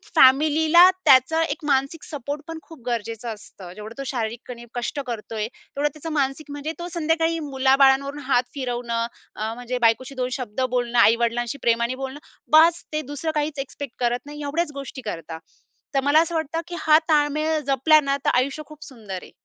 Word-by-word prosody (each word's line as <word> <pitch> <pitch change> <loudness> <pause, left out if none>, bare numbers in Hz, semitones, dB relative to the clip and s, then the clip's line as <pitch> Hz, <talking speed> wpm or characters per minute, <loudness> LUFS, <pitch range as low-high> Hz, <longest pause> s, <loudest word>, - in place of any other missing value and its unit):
फॅमिलीला 310 +6 +6 0.2
त्याचा 270 +5 +5
एक 320 -1 -4
मानसिक 275 +3 0
सपोर्ट 285 0 -5
पण 325 -1 -6
खूप 325 -3 -14
गरजेचं 230 0 -3
असतं. 190 -3 -12
जेवढं 215 +3 -9
तो - - -3
शारीरिकपणे 235 0 -5
कष्ट 245 +4 -3
करतोय 220 -2 -4
तेवढं 285 +4 -4
त्याचं 310 +2 -7
मानसिक 285 0 -1
म्हणजे 290 +2 -4
तो 345 - -4
संध्याकाळी 325 0 +1
मुलाबाळांवरून 270 +1 +3
हात 250 -2 +4
फिरवणं 240 -3 -2 0.3
अ, 220 +1 -3
म्हणजे 245 +1 -4
बायकोशी 260 +4 -1
दोन 255 -1 -1
शब्द 250 0 -4
बोलणं, 245 -1 0
आई 230 0 +6
वडिलांशी 240 +3 -1
प्रेमाने 235 +2 +1
बोलणं. 270 +2 -5 0.4
बास 335 +1 +5
ते 305 - 0
दुसरं 315 +3 -2
काहीच 295 -1 -1
एक्स्पेक्ट 275 -1 -6
करत 240 0 +1
नाही. 295 +1 -9
एवढ्याच 300 +2 -1
गोष्टी 275 -1 -7
करतात. 165 -7 -6 0.6
तर 275 - +3
मला 290 +3 +5
असं 335 0 -2
वाटतं, 320 +1 -2
की 350 - -6
हा 310 0 +6
ताळमेळ 305 +1 +2
जपला 280 +3 +5
ना, 275 -1 0
तर - - +4
आयुष्य 270 +4 0
खूप 305 -1 -12
सुंदर 210 -8 -8
आहे. - - -14
270 Hz, 175 wpm, -23 LUFS, 240-305 Hz, 0.6 s, फॅमिलीला